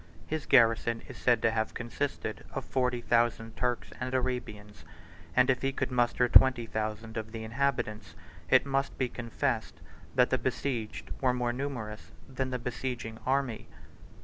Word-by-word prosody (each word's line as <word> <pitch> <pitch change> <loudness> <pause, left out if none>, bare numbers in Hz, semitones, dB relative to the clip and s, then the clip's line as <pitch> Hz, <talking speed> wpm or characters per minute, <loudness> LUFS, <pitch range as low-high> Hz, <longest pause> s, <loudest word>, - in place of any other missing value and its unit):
His 155 -1 -4
garrison 115 -1 +4
is - - -9
said 120 -3 +2
to 115 - +4
have 110 -1 -1
consisted 120 +4 -3
of - - -4
forty 125 -2 0
thousand 115 -1 +1
Turks 125 +1 -1
and 130 +1 -2
Arabians; 120 -5 -3 0.5
and 125 - +5
if 130 -2 +2
he 135 - +1
could 135 - -2
muster 125 0 +2
twenty 125 -1 +6
thousand 110 +1 -4
of 110 0 -4
the 110 -1 -6
inhabitants, 115 -2 -2 0.3
it - - +6
must 135 0 -1
be 130 - +1
confessed 115 -2 -2 0.4
that 125 -1 +4
the 130 - +2
besieged 125 -3 -3
were 125 -2 +3
more 120 -1 0
numerous 120 -5 -5
than 130 0 -3
the 130 - -1
besieging 120 -2 -4
army. 130 -4 0
120 Hz, 155 wpm, -30 LUFS, 115-130 Hz, 0.5 s, twenty